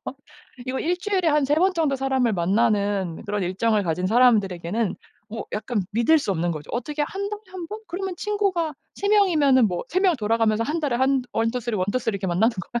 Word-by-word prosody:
번?" - - -5 0.5
이거 260 +1 -2
일주일에 365 +2 -1
한 300 -1 +3
3 285 +2 +2
번 370 +2 +3
정도 305 -5 +1
사람을 265 -3 +1
만나는 200 -1 0
그런 205 0 -2
일정을 205 +4 +1
가진 180 +1 -1
사람들에게는 210 -3 +2 0.4
뭐 225 +1 -6
약간 215 +1 -2
믿을 235 +9 +4
수 275 - -3
없는 175 -1 -1
거죠. 155 -3 -6
"어떻게 295 +5 -2
1 390 +7 -3
달에 420 0 -5
1 365 -2 -7
번? 425 +5 -7
그러면 370 +2 -4
친구가 380 -6 -1 0.2
3 400 - -3
명이면은 310 - +4
뭐 175 -1 -3
3 365 - 0
명 375 -3 +4
돌아가면서 225 -1 +1
1 305 +7 -2
달에 275 -6 0
한 265 +1 +2
1-2-3, 230 0 -1
1-2-3 205 +4 -1
이렇게 195 -1 -3
만나는 185 +6 +2
거야?" 240 +6 -4
240 Hz, 345 characters per minute, -23 LUFS, 205-325 Hz, 0.5 s, 믿을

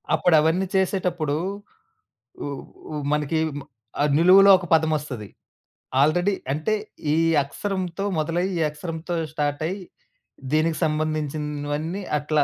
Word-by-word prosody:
అప్పుడు 175 -3 +3
అవన్నీ 170 +5 +2
చేసేటప్పుడు 180 -6 0 1.1
ఉ - - -3 0.5
ఉ - - -3 0.2
మనకి 150 +1 0 0.6
ఆహ్, 150 - +2
నిలువులో 190 +4 +7
ఒక 180 - -7
పదమస్తది. 150 -8 0 0.7
ఆల్రెడీ 175 +7 +3 0.2
అంటే 155 +9 -1 0.4
ఈ - - +3 0.3
అక్షరంతో 190 +4 -4
మొదలై, 165 +4 0
ఈ - - -1
అక్షరంతో 165 +3 -5 0.2
స్టార్ట్ 145 -1 -1
అయ్యి, 190 +2 -4 0.7
దీనికి 155 +1 +2
సంబంధించినవన్నీ 155 +2 -2 0.2
అట్లా 150 0 +1
160 Hz, 105 wpm, -24 LUFS, 150-180 Hz, 1.1 s, నిలువులో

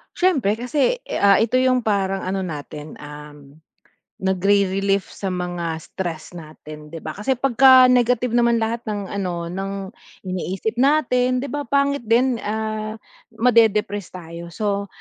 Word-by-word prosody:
Siyempre 275 - +2
kasi, 275 - 0
eh, - - -4
ah, 200 -1 +6
ito 255 +3 +1
yung 255 -2 +2
parang 195 -2 0
ano 190 +1 -2
natin, 150 -3 -7
um, 150 0 -12 0.6
nagri-relief 195 +1 +1
sa 195 -2 -5
mga 175 -2 -3
stress 170 -4 -6
natin, 155 -2 -11
'di 165 - -5
ba, 155 - -5
kasi 210 +7 -1
pagka-negative 250 -2 +5
naman 235 -1 +3
lahat 230 +1 -2
ng 205 -2 -3
ano 180 -4 -3
ng 195 +1 -5 0.4
iniisip 185 +4 -3
natin, 255 -3 +2
'di - - -3
ba, 290 0 -4
pangit 280 0 +1
din, 245 +3 +3
ah, 215 0 -3 0.4
ma-dedepress 215 -4 +2
tayo 170 -1 -8
so, 200 +2 -2
200 Hz, 135 wpm, -21 LUFS, 180-245 Hz, 0.6 s, ah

